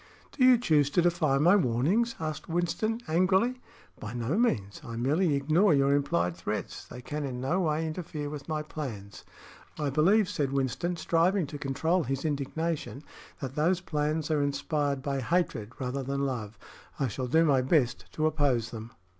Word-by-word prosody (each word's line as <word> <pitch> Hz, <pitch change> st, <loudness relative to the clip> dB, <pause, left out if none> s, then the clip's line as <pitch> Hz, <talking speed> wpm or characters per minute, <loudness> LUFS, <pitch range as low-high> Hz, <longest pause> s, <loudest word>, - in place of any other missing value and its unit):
"Do 265 Hz, -, 0 dB
you 255 Hz, -1 st, +7 dB
choose 150 Hz, -, +2 dB
to 175 Hz, -, +2 dB
defy 165 Hz, -5 st, +2 dB
my 170 Hz, +7 st, +5 dB
warnings?" 180 Hz, -, +1 dB
asked 155 Hz, -1 st, -5 dB
Winston, 195 Hz, +7 st, -1 dB
angrily. 190 Hz, +10 st, +2 dB, 0.4 s
"By 110 Hz, +2 st, -6 dB
no 120 Hz, +6 st, -1 dB
means. 105 Hz, -, 0 dB
I 115 Hz, -, -7 dB
merely 145 Hz, +7 st, +1 dB
ignore 155 Hz, +6 st, +3 dB
your 140 Hz, 0 st, +3 dB
implied 90 Hz, -12 st, +1 dB
threats. 85 Hz, -, -4 dB
They 125 Hz, -, -10 dB
can 150 Hz, +3 st, -4 dB
in 130 Hz, -3 st, -4 dB
no 135 Hz, +9 st, 0 dB
way 160 Hz, -2 st, 0 dB
interfere 155 Hz, -2 st, -5 dB
with 145 Hz, 0 st, -7 dB
my 155 Hz, -1 st, -1 dB
plans." 110 Hz, -, -7 dB, 0.5 s
"I 145 Hz, -2 st, -1 dB
believe," 185 Hz, +9 st, +4 dB
said 140 Hz, -6 st, -2 dB
Winston, 140 Hz, +6 st, -1 dB
striving 170 Hz, +2 st, +2 dB
to 145 Hz, +1 st, -8 dB
control 160 Hz, +6 st, 0 dB
his 135 Hz, +4 st, -3 dB
indignation, 150 Hz, -2 st, -2 dB, 0.4 s
"that 135 Hz, -2 st, -4 dB
those 170 Hz, +5 st, +2 dB
plans 155 Hz, -2 st, -1 dB
are 150 Hz, -2 st, +2 dB
inspired 145 Hz, -1 st, -1 dB
by 140 Hz, -2 st, -1 dB
hatred 130 Hz, -6 st, -1 dB
rather 130 Hz, +1 st, -3 dB
than 140 Hz, +1 st, -2 dB
love. 115 Hz, -5 st, -4 dB, 0.4 s
I 135 Hz, -, +1 dB
shall 130 Hz, 0 st, -4 dB
do 160 Hz, +6 st, +4 dB
my 135 Hz, -4 st, +4 dB
best 130 Hz, -3 st, +1 dB
to 155 Hz, -, 0 dB
oppose 135 Hz, -7 st, +1 dB
them." 115 Hz, 0 st, -7 dB
150 Hz, 170 wpm, -29 LUFS, 130-170 Hz, 0.5 s, you